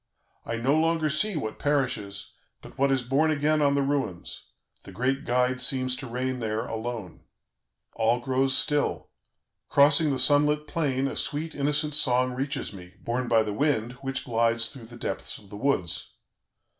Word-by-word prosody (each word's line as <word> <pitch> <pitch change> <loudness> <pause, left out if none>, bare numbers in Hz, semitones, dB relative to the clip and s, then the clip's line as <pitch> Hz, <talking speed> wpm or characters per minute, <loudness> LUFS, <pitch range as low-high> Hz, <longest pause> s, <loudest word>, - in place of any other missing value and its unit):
I 115 - -2
no 130 +5 +1
longer 160 -1 +2
see 200 +7 +1
what 110 -8 -4
perishes, 135 -9 -1 0.3
but - - -12
what 140 +1 +2
is 135 -2 +1
born 140 +6 +2
again 155 0 +2
on 140 -1 +3
the 140 - +2
ruins; 135 -11 -3 0.3
the - - -12
great 130 +7 -1
Guide 125 +1 +1
seems 130 0 0
to 130 - -7
reign 125 +2 -2
there 110 -1 -2
alone. 115 -4 -5 0.7
"All 115 +2 +2
grows 130 +2 +1
still. 150 -1 0 0.6
Crossing 145 +2 +5
the 135 - 0
sun 145 +3 +5
lit 150 0 0
plain, 140 -4 0
a - - -4
sweet, 155 +2 -2
innocent 145 +1 0
song 125 -3 +3
reaches 135 -1 -3
me, 90 -1 -12
borne 125 +2 -2
by 115 -2 +4
the 105 -1 -3
wind, 120 -2 0
which 135 0 -3
glides 115 -1 +1
through 120 -3 -11
the 120 +1 -12
depths - - -3
of 100 - -16
the - - -8
woods. 105 -9 -1
130 Hz, 170 wpm, -26 LUFS, 115-145 Hz, 0.7 s, Crossing